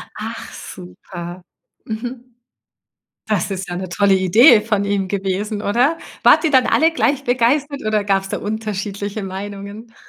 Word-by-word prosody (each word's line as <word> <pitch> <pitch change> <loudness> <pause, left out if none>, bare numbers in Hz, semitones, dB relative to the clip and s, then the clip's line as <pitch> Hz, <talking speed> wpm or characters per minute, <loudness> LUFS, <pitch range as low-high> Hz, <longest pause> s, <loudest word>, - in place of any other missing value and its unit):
Ach - - -7
super. 175 - -9 0.4
Mhm. 245 +2 -7 0.9
Das 205 -3 0
ist 190 -1 -4
ja 175 - -4
'ne 185 0 -5
tolle 195 +2 +3
Idee 215 - +6
von 210 -2 0
ihm 200 -1 0
gewesen, 200 +2 -2
oder? 250 +11 +2 0.3
Wart - - +6
ihr 320 - +3
dann 260 -3 +4
alle 320 +1 +4
gleich 285 -3 0
begeistert 270 +4 +1
oder 215 -1 +1
gab's 195 -1 0
da - - -3
unterschiedliche 205 -1 -4
Meinungen? 200 +4 -7
205 Hz, 145 wpm, -19 LUFS, 195-240 Hz, 0.9 s, Idee